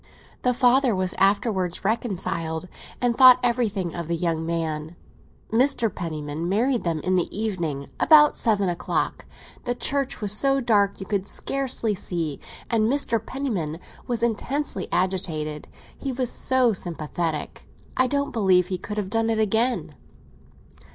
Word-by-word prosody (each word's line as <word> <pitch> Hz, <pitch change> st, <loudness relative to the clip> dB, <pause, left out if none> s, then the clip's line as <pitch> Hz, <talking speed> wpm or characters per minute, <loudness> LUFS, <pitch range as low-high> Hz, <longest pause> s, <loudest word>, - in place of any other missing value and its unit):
The 250 Hz, -1 st, +1 dB
father 250 Hz, -1 st, +4 dB
was 185 Hz, -1 st, -1 dB
afterwards 195 Hz, -2 st, +1 dB
reconciled, 185 Hz, -6 st, -2 dB, 0.3 s
and 245 Hz, -1 st, +1 dB
thought 255 Hz, 0 st, +8 dB
everything 220 Hz, -8 st, 0 dB
of 170 Hz, -2 st, -5 dB
the 170 Hz, -, 0 dB
young 165 Hz, -1 st, -1 dB
man. 160 Hz, -1 st, -3 dB, 0.6 s
Mr. 235 Hz, -1 st, +2 dB
Penniman 155 Hz, -1 st, -4 dB
married 235 Hz, +5 st, +1 dB
them 165 Hz, -3 st, -1 dB
in 185 Hz, +3 st, +1 dB
the 175 Hz, -, 0 dB
evening, 170 Hz, -10 st, -2 dB
about 300 Hz, -2 st, +7 dB
seven 205 Hz, -4 st, +1 dB
o'clock. 175 Hz, -1 st, -2 dB, 0.4 s
The 245 Hz, 0 st, -1 dB
church 275 Hz, +1 st, -1 dB
was 205 Hz, -2 st, -1 dB
so 275 Hz, +6 st, +4 dB
dark, 205 Hz, -5 st, +2 dB
you 195 Hz, -, -6 dB
could 200 Hz, -2 st, -2 dB
scarcely 260 Hz, -5 st, -1 dB
see; 170 Hz, -6 st, -3 dB, 0.3 s
and 225 Hz, 0 st, +2 dB
Mr. 235 Hz, -6 st, 0 dB
Penniman 205 Hz, -, -3 dB, 0.3 s
was 240 Hz, -1 st, -1 dB
intensely 235 Hz, -1 st, -1 dB
agitated; 160 Hz, -5 st, -2 dB, 0.3 s
he 275 Hz, -, -4 dB
was 255 Hz, -1 st, -1 dB
so 255 Hz, -3 st, +2 dB
sympathetic. 165 Hz, -3 st, -4 dB, 0.3 s
I 255 Hz, -, +3 dB
don't 280 Hz, +2 st, -1 dB
believe 190 Hz, -5 st, +3 dB
he 185 Hz, -2 st, -2 dB
could 210 Hz, +3 st, -6 dB
have 200 Hz, -2 st, -3 dB
done 225 Hz, 0 st, +1 dB
it 225 Hz, -, +1 dB
again." 220 Hz, +4 st, +1 dB
205 Hz, 145 wpm, -24 LUFS, 170-245 Hz, 0.6 s, thought